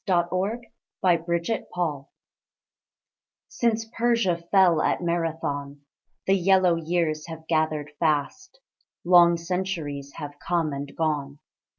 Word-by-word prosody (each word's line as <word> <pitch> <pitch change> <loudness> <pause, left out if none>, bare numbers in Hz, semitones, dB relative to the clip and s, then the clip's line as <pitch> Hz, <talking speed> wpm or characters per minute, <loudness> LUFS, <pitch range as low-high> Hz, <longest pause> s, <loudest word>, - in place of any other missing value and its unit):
Villanelle 185 +5 0 0.4
of 170 -3 +3 0.2
Change 170 -9 -3 1.4
Since 225 -1 0
Persia 230 -7 +2
fell 180 -5 +5
at - - 0
Marathon, 160 -4 -2 0.4
The 190 - +3
yellow 190 -1 +4
years 165 -2 -1
have 160 -1 -9
gathered 155 -2 0
fast: 165 - -1 0.5
Long 175 -1 +6
centuries 165 -6 -4
have 145 0 -8
come 165 -4 -1
and 140 0 -5
gone. 150 -3 -1
170 Hz, 100 wpm, -25 LUFS, 150-185 Hz, 1.4 s, Long